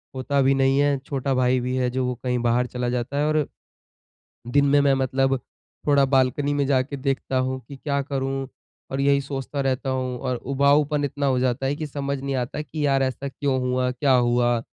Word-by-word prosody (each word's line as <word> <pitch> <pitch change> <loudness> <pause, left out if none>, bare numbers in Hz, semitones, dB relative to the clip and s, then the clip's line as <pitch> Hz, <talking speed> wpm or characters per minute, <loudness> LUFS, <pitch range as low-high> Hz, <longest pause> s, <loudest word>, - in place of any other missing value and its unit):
होता 140 +2 0
भी 135 +1 +4
नहीं 135 +1 +3
है, 145 -1 +3
छोटा 135 0 -2
भाई 130 0 +2
भी 125 +1 -2
है 125 -1 +1
जो 130 +1 -1
वो 125 0 -2
कहीं 125 -1 0
बाहर 120 +1 +2
चला 125 0 -3
जाता 125 +3 -2
है 145 - +2
और 155 -2 +2 1.0
दिन 140 +4 +3
में 145 +1 +4
मैं 140 -1 +4
मतलब 135 0 +1 0.5
थोड़ा 140 -1 +5
बालकनी 135 +2 +1
में 140 -1 +1
जाके 135 +1 0
देखता 135 0 -1
हूँ 130 0 -1
कि 140 - -9
क्या 140 +1 -1
करूँ 135 -1 -3 0.4
और 135 +1 -1
यही 140 0 +3
सोचता 140 +1 -4
रहता 135 0 -1
हूँ 130 -1 -2
और 130 -2 -2
उबाऊपन 140 +3 +2
इतना 145 +1 -3
हो 130 -2 +2
जाता 130 +1 0
है 140 - 0
कि 155 0 -4
समझ 140 -1 -3
नहीं 135 0 -3
आता 125 +4 -3
कि 150 +1 -3
यार 135 -1 +2
ऐसा 135 +1 -2
क्यों 135 0 -1
हुआ? 125 0 0
क्या 135 +2 +1
हुआ? 120 -1 +2
135 Hz, 210 wpm, -24 LUFS, 130-140 Hz, 1.0 s, थोड़ा